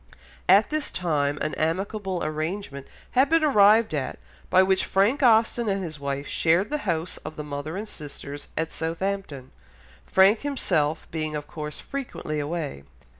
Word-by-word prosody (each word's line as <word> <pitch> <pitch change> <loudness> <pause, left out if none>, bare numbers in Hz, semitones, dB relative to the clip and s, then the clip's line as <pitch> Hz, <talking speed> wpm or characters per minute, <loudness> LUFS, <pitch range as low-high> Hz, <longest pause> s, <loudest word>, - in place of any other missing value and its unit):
At 200 +7 +6
this 305 -1 -1
time 145 -5 0
an 155 - -1
amicable 190 +3 -1
arrangement 155 -2 -4 0.2
had 260 +2 +4
been 330 0 +4
arrived 215 - +5
at, 140 -3 -2 0.3
by 185 +1 +6
which 190 0 +2
Frank 210 +10 +2
Austen 230 -1 +4
and 195 -1 -1
his 155 -4 -6
wife 140 0 -3
shared 175 +6 +2
the 300 - 0
house 165 +1 -1
of 155 - -8
the 150 - -5
mother 145 +3 -5
and 215 +2 -5
sisters 145 -3 -8
at 160 +1 -1
Southampton, 165 -5 -3 0.6
Frank 195 +3 +5
himself 170 - 0
being 155 -1 -3
of 145 -1 -4
course 150 -1 -6
frequently 245 - -5
away. 145 - -4
170 Hz, 155 wpm, -25 LUFS, 150-205 Hz, 0.6 s, At